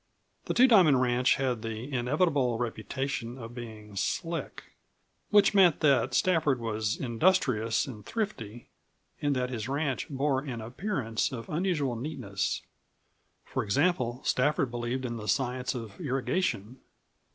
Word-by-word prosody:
The - - -2
Two 255 +2 +7
Diamond 180 - +6
ranch 125 0 +3
had 125 -4 -1
the 115 +4 -5
enviable 130 -1 +1
reputation 120 +2 -3
of 115 -2 -8
being 110 -4 -9
"slick" 165 - -3 0.7
which 205 -1 +5
meant 185 -6 +5
that 135 -4 +3
Stafford 155 -6 +2
was 110 -1 -2
industrious 120 - +2
and 115 -7 -9
thrifty 120 - -4 0.5
and 145 -1 +1
that 125 0 -1
his 115 -1 -4
ranch 140 -1 -1
bore 135 -1 +1
an 130 -4 -5
appearance 120 - -2
of 115 -3 -7
unusual 155 -6 0
neatness. 110 -7 -3 0.8
For - - -2
example, 125 - +1
Stafford 140 -1 +1
believed 120 +2 -3
in 120 -1 -3
the 105 -1 -7
science 125 0 0
of 115 -4 -7
irrigation. 130 - -1
130 Hz, 130 wpm, -29 LUFS, 115-150 Hz, 0.8 s, Two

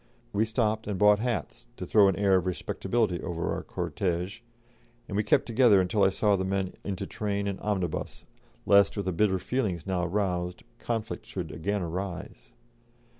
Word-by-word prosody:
We 105 +2 +2
stopped 110 -1 0
and 105 -2 -2
bought 105 +1 +5
hats, 120 0 -3
to 90 - -5
throw 100 +2 +5
an 95 - +2
air 100 -1 +3
of 95 -1 +1
respectability 90 +1 -1
over 85 -2 -2
our - - -3
cortège, 90 +1 -3 0.7
and 100 - -5
we 105 - +3
kept 105 - +2
together 115 -4 +5
until 95 +3 +2
I - - +6
saw 100 +1 +2
the 95 - -1
men 95 0 -1
into 100 -1 -3
train 100 0 -2
and 100 -1 -3
omnibus, 95 -6 -3 0.4
lest, 100 +1 +5
with 100 - -2
the 95 - -1
bitter 95 +1 +2
feelings 95 - -2
now 95 -2 -1
roused, 90 -2 -2 0.2
conflict 115 -1 -4
should 90 -5 -5
again 100 +4 -2
arise. 85 -9 -6
100 Hz, 175 wpm, -28 LUFS, 90-105 Hz, 0.7 s, I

